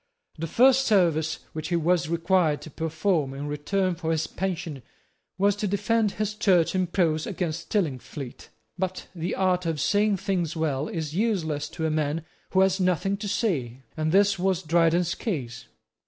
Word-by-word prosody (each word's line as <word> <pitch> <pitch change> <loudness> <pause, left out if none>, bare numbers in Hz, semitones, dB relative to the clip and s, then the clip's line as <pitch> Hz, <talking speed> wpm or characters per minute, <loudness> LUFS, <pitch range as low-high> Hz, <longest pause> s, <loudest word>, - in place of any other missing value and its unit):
The 165 - -2
first 265 - +4
service 165 -7 +2 0.2
which 155 0 -4
he 175 - 0
was 170 -1 +1
required 170 -2 +2
to 155 - -10
perform 160 -2 -1
in 140 +1 -5
return 180 +6 0
for 165 -1 -4
his 160 -1 0
pension 170 -7 -4 0.6
was 200 +1 +3
to 205 - -1
defend 210 +2 +1
his 215 0 -2
Church 185 -6 +3
in 185 -1 +1
prose 165 -4 +1
against 170 -4 -3
Stillingfleet. 140 - -3 0.3
But 185 0 -2
the 175 0 -3
art 180 -2 +1
of 160 -2 -1
saying 205 +5 +2
things 175 -4 -1
well 150 -3 -1
is 155 -3 -4
useless 165 -8 0
to 160 - -4
a 160 - +1
man 155 +1 -1 0.2
who 190 - +3
has 190 0 +3
nothing 185 +1 +1
to 205 +1 -5
say; 135 - -1
and 155 0 0
this 200 +1 +4
was 190 -1 +1
Dryden's 170 +1 +2
case. 130 - -4
170 Hz, 170 wpm, -26 LUFS, 155-195 Hz, 0.6 s, first